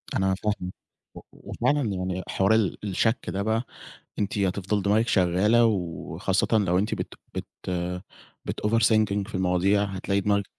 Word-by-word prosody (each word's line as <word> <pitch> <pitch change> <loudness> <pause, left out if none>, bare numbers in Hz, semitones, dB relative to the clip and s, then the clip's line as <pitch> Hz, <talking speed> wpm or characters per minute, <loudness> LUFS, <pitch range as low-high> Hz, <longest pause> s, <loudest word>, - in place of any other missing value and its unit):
أنا 95 0 +2
فاهمِك 100 -2 -3 0.4
و - - -8
وفعلاً 145 0 -1
يعني 95 0 -3
حوار 95 +3 +2
ال 105 -6 +1
الشَك 110 +4 0
ده 100 - -2
بقى 110 +3 0 0.6
أنتِ 105 0 -1
هتفضل 100 +1 0
دماغِك 110 +4 +2
شغالة 105 +4 +4
وخاصةً 90 -8 -1
لو 90 -3 +2
أنتِ 105 +3 0
بت - - -5 0.2
بت - - -4 1.0
بتoverthinking 110 -2 +2
في - - -6
المواضيع 95 +2 +2
هتلاقي 100 0 -1
دماغِك 100 0 +1
100 Hz, 135 wpm, -26 LUFS, 95-110 Hz, 1.0 s, شغالة